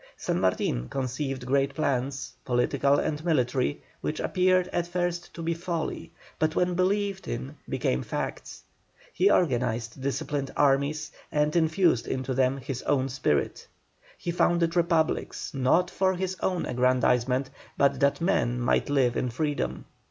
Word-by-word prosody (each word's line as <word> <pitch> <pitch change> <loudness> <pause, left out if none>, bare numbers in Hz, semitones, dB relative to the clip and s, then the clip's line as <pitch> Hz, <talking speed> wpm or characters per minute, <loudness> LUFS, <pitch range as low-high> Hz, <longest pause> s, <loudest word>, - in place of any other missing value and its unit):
San - - -1
Martin 65 -9 0
conceived 135 0 -3
great 140 +1 +1
plans, 135 -2 -1
political 130 +3 +2
and 155 0 -1
military, 135 -3 0 0.2
which 155 - -3
appeared 185 0 +2
at 175 0 -1
first 175 0 -2
to 165 - -6
be 165 +1 0
folly, 170 -1 -4 0.3
but 155 0 +1
when 180 0 +2
believed 195 +2 0
in 130 +5 -4
became 65 - 0
facts. - - -5 0.5
He 190 +3 +4
organized 120 - +1
disciplined 140 0 -2
armies, 145 +1 +2 0.2
and 150 +1 +1
infused 160 -5 +3
into 130 0 -2
them 130 +1 +2
his 135 -2 -5
own 135 -2 +1
spirit. 120 - -1 0.5
He 175 - -3
founded 170 -1 +2
republics, 170 -2 0
not 145 +7 +2
for 190 -1 +1
his 185 +1 -2
own 180 -2 0
aggrandisement, 125 +1 +2 0.3
but 140 0 +3
that 140 0 +2
men 125 -9 +1
might 120 +3 +1
live 130 -4 +2
in 125 - 0
freedom. 145 +4 -2
140 Hz, 140 wpm, -27 LUFS, 130-170 Hz, 0.5 s, He